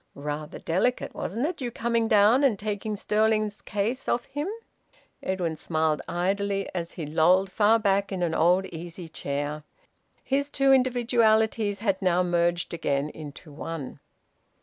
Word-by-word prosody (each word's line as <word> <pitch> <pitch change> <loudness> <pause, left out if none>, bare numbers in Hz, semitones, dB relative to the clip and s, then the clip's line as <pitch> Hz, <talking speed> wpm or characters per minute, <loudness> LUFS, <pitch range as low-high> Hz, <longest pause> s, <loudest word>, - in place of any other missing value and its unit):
"Rather 150 +2 -5
delicate, 190 +10 0
wasn't 230 +7 -2
it, 330 -2 -3
you 245 - -2
coming 230 -1 0
down 220 +5 +5
and 250 -7 +3
taking 210 +1 -3
Stirling's 215 0 +1
case 220 +6 -2
off 240 - 0
him?" 290 +4 -4 0.7
Edwin 180 -4 -2
smiled 155 -1 0
idly 195 +3 -1
as 170 -2 -4
he 165 - -5
lolled 180 +6 +3
far 220 +2 +4
back 200 -2 +1
in 185 -2 -2
an 165 -2 0
old 180 +4 +3
easy 170 +1 -7
chair. 145 0 -4 0.6
His 280 +1 0
two 275 -1 +3
individualities 230 -4 +2
had 195 -4 0
now 180 -1 +3
merged 175 0 0
again 145 -3 -1
into 150 +1 -10
one. 155 -2 -6
195 Hz, 145 wpm, -26 LUFS, 165-225 Hz, 0.7 s, down